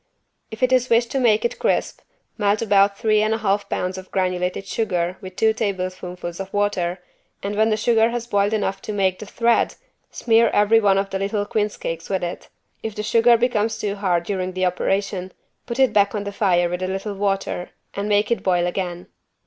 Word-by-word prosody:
If 220 +3 -6
it 255 0 +3
is 255 -1 +3
wished 235 0 +3
to 270 - 0
make 225 -3 +3
it 235 - -2
crisp, - - 0 0.4
melt 205 +1 +1
about 200 -2 +3
three 215 -1 +2
and 215 +1 +1
a - - -2
half 205 -2 0
pounds 185 +1 -2
of 190 - -12
granulated 185 0 -1
sugar 180 -5 -1
with 185 -2 -9
two 220 +2 +3
tablespoonfuls 185 -4 -4
of 195 0 -6
water 195 -4 0 0.5
and 200 +1 -3
when 220 +1 +3
the 215 - +1
sugar 225 0 +3
has 235 0 -3
boiled 205 -3 +1
enough 195 -2 -1
to 215 - -5
"make 190 -2 +1
the 215 - -8
thread" 235 +2 +1 0.3
smear 230 0 +3
every 210 +2 +5
one 200 -3 +3
of 195 0 -1
the 190 - -2
little 205 +1 -1
quince 210 0 -1
cakes 165 0 -5
with 190 -2 -1
it. 175 0 -5 0.3
If 220 -2 -5
the 210 - -3
sugar 230 +2 +4
becomes 225 -2 0
too 205 -1 -2
hard 185 -4 0
during 185 -1 -3
the 185 0 0
operation 185 +1 -1 0.3
put 235 -1 -4
it 265 -4 +3
back 200 0 +3
on 205 - -2
the 200 - -5
fire 180 -4 +2
with 180 +1 -4
a 185 - -1
little 195 +2 -3
water 195 -2 -2 0.2
and 200 +1 -3
make 205 +2 +2
it 230 -5 +1
boil 180 -2 +2
again. 175 -1 -3
200 Hz, 210 wpm, -22 LUFS, 185-220 Hz, 0.5 s, every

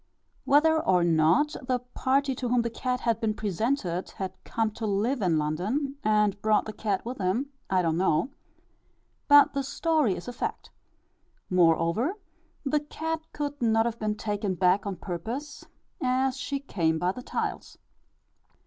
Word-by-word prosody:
Whether 315 +3 +4
or 180 -2 +3
not 170 - +3
the 255 - +2
party 260 +2 0
to 250 -1 -3
whom 245 -1 +3
the 235 - -2
cat 250 +2 -2
had 230 -2 0
been 215 -2 0
presented 205 -3 -1
had 190 -1 -3
come 225 -1 -1
to 220 +1 -4
live 215 +6 0
in 175 -5 +2
London, 200 - -1
and 210 -2 +2
brought 215 -1 +3
the 215 - -6
cat 205 -3 -2
with 245 +1 -5
him, 215 +10 -1 0.2
I 185 -1 +2
do 165 - +2
not 160 - 0
know; 175 - +2 1.0
but 290 0 +7
the 280 - 0
story 285 - +1
is 175 - -8
a 245 - -5
fact. - - -4 0.8
Moreover, 175 - +3 0.5
the 295 +2 +2
cat 320 +2 -4
could 290 -1 -4
not 225 -1 +3
have 235 -1 -2
been 215 -1 -1
taken 205 -2 -2
back 185 +3 +2
on 195 - -2
purpose, 225 - -6 0.4
as 255 +1 +1
she 275 +2 -3
came 165 - 0
by 180 +3 +1
the 250 - -8
tiles. - - -4
225 Hz, 165 wpm, -27 LUFS, 185-270 Hz, 1.0 s, but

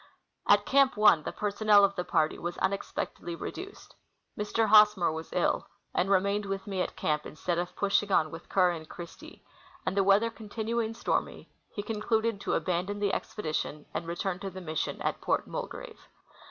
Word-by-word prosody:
At - - +5
Camp 275 -2 +4
1 210 -7 +6
the - - -4
personnel 210 0 +3
of 200 0 -2
the 180 - -2
party 155 -3 +1
Avas 175 +1 -5
unexpectedly 190 -3 -3
re - - -5
duced. 390 +3 -10 0.4
Mr. 210 +2 0
Hosnier 210 -5 +6
Avas 160 +1 -6
ill, 180 - 0 0.3
and 185 - +1
remained 200 +1 +2
Avith 195 +1 -4
me 195 -3 -2
at - - -3
camp 150 0 0
instead 170 +3 -2
of 175 0 -4
pushing 200 0 +1
on 155 -4 +3
AAdth 165 +1 -10
Kerr 180 -2 +4
and 160 -2 -7
Christie; 170 -1 -11 0.4
and - - -1
the 200 - +3
Aveather 205 +4 +3
continuing 225 +1 -3
stormy, - - -2 0.2
he 205 - -5
concluded 220 0 -1
to - - 0
abandon 185 +3 -1
the 205 -1 0
expedition 155 -6 -3
and 165 - -3
return 175 +2 -2
to 195 0 -4
the 190 0 -8
mission 160 -4 -3
at - - -2
Port - - 0
Mulgrave. - - -7
195 Hz, 180 wpm, -29 LUFS, 175-210 Hz, 0.4 s, 1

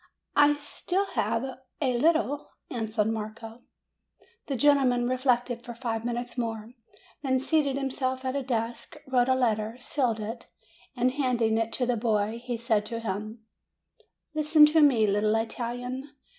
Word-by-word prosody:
"I 290 0 +6
still 355 +6 -2
have 230 +1 0 0.4
a 260 -4 +1
little," 305 -1 +1 0.2
answered 220 -2 -1
Marco. 225 +1 -5 0.9
The 275 - -1
gentleman 255 -2 +3
reflected 250 -2 0
for 240 -1 -8
five 225 -2 -3
minutes 240 +1 -3
more; 225 -1 -4 0.5
then 260 -2 +1
seated 280 0 +1
himself 260 -1 -2
at 260 +1 -1
a 280 - 0
desk, 240 +3 -3
wrote 255 -1 +2
a 260 - +4
letter, 225 -2 0
sealed 245 -3 -1
it, 225 +3 -6 0.5
and 250 0 +2
handing 240 -5 +1
it 225 0 -1
to 250 - 0
the 245 -1 0
boy, 220 0 0
he 245 -1 -3
said 225 -3 +1
to 230 +1 -4
him: 215 +1 -5 0.9
"Listen 305 0 +6
to 310 +1 +4
me, 255 -7 +5
little 210 +1 +2
Italian. 245 +4 -3
245 Hz, 145 wpm, -27 LUFS, 225-265 Hz, 0.9 s, I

